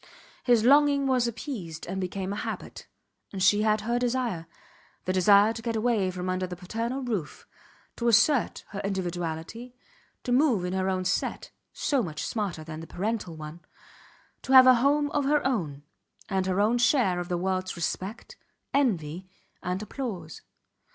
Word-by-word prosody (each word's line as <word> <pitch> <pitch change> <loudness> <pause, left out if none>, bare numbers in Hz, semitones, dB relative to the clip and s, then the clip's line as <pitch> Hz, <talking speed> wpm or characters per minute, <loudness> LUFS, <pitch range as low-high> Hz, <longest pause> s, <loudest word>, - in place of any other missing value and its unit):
His 240 -3 +4
longing 285 +2 +5
was 255 -3 +2
appeased 220 - -6
and 190 +2 -4
became 190 +1 -3
a - - -5
habit; - - -6 0.4
and 190 -2 -3
she 205 +2 +5
had 215 0 +2
her 235 +3 0
desire 240 -9 -1 0.6
the 185 - 0
desire 200 +4 +5
to 225 - -7
get 230 0 -2
away 220 -4 +1
from 180 0 -5
under 185 0 -1
the 180 - -6
paternal 230 +8 -4
roof, 210 -11 -4 0.5
to 235 - -1
assert 235 +3 +3
her 200 - -6
individuality, 180 +4 -4 0.5
to 245 - -3
move 250 - +3
in 180 - -3
her 190 0 0
own 185 -1 -1
set 180 - -2 0.2
(so 280 -4 0
much 155 -6 -4
smarter 200 -8 -3
than 155 0 -7
the 165 - -9
parental 200 -3 -3
one); 155 +1 -8 0.8
to 265 - -2
have 260 -1 +10
a 255 - +8
home 290 +4 +2
of 290 -2 0
her 295 +1 +2
own, 160 - -1 0.4
and 190 -2 -1
her 185 +1 0
own 225 +4 +3
share 240 -7 +3
of 175 - -5
the 175 - 0
worlds 185 +1 -2
respect, 185 +5 -4 0.4
envy, 185 - 0 0.3
and 180 +3 -3
applause. 205 - -6
205 Hz, 165 wpm, -27 LUFS, 180-245 Hz, 0.8 s, have